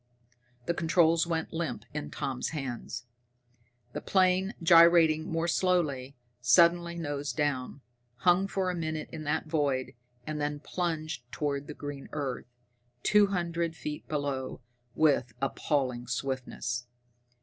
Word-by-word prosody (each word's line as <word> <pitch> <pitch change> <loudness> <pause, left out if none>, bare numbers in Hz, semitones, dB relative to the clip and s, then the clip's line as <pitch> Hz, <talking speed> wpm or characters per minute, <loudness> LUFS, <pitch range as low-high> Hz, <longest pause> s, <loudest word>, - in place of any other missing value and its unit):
The 170 - +1
controls 165 0 +3
went 165 -1 -2
limp 160 -10 -3
in 150 0 -4
Tommy's 130 -2 -3
hands. 125 -4 -5 0.9
The - - -4
plane, 190 +2 +2
gyrating 165 -2 +6
more 165 +1 0
slowly, 155 -7 +1 0.3
suddenly 170 +7 +4
nosed 145 -5 -3
down, 145 -2 -1 0.3
hung 180 +8 +3
for 190 -2 -1
a - - -4
moment 160 -2 -3
in 155 -1 -6
that 150 +3 0
void, 145 -5 0 0.3
and 155 -1 -3
then 145 0 -1
plunged 155 -6 -3
toward 145 -1 -2
the 150 - -7
green 145 -1 -7
earth, 135 -5 -3 0.6
two 210 -1 +5
hundred 170 -3 -1
feet 150 -1 -6
below, 140 -3 -3 0.3
with 140 -6 +3
appalling 130 -3 -1
swiftness. 125 -1 -3
155 Hz, 125 wpm, -29 LUFS, 135-170 Hz, 0.9 s, gyrating